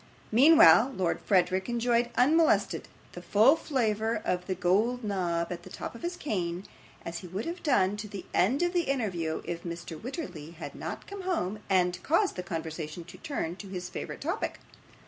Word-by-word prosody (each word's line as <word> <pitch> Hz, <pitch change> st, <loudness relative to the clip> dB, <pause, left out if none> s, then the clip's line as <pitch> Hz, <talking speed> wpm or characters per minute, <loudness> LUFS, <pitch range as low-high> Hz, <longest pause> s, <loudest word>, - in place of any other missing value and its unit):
Meanwhile, 275 Hz, 0 st, +7 dB
Lord 180 Hz, -3 st, 0 dB
Verisopht 185 Hz, +1 st, +2 dB
enjoyed 240 Hz, 0 st, +1 dB
unmolested 315 Hz, +6 st, +3 dB, 0.2 s
the -, -, -9 dB
full 225 Hz, +9 st, +5 dB
flavour 225 Hz, -8 st, 0 dB
of 180 Hz, 0 st, -1 dB
the 190 Hz, -, -1 dB
gold 215 Hz, +8 st, +1 dB
knob 175 Hz, -5 st, -1 dB
at 175 Hz, -1 st, -5 dB
the -, -, -12 dB
top -, -, -6 dB
of 235 Hz, -, -11 dB
his 350 Hz, +1 st, -3 dB
cane, 180 Hz, -, -2 dB, 0.4 s
as 170 Hz, 0 st, -4 dB
he 180 Hz, -, -9 dB
would 190 Hz, +5 st, -4 dB
have 340 Hz, +2 st, -5 dB
done 205 Hz, -, +2 dB
to 210 Hz, 0 st, -5 dB
the 200 Hz, -2 st, -8 dB
end 245 Hz, -, +3 dB
of 350 Hz, 0 st, +1 dB
the 350 Hz, -2 st, +1 dB
interview 180 Hz, -12 st, -1 dB
if 170 Hz, -1 st, -4 dB
Mr. 170 Hz, -2 st, -7 dB
Wititterly 180 Hz, -, -6 dB
had 165 Hz, -, -7 dB
not -, -, -6 dB
come 400 Hz, 0 st, -7 dB
home, 270 Hz, -, -1 dB
and 180 Hz, -1 st, +2 dB
caused 365 Hz, +6 st, +2 dB
the 180 Hz, -, -3 dB
conversation 160 Hz, -1 st, -5 dB
to 175 Hz, -, -13 dB
turn 230 Hz, -, -3 dB
to 200 Hz, -, -9 dB
his 180 Hz, -2 st, -5 dB
favourite -, -, -6 dB
topic. 345 Hz, +9 st, -2 dB
200 Hz, 185 wpm, -29 LUFS, 175-265 Hz, 0.4 s, Meanwhile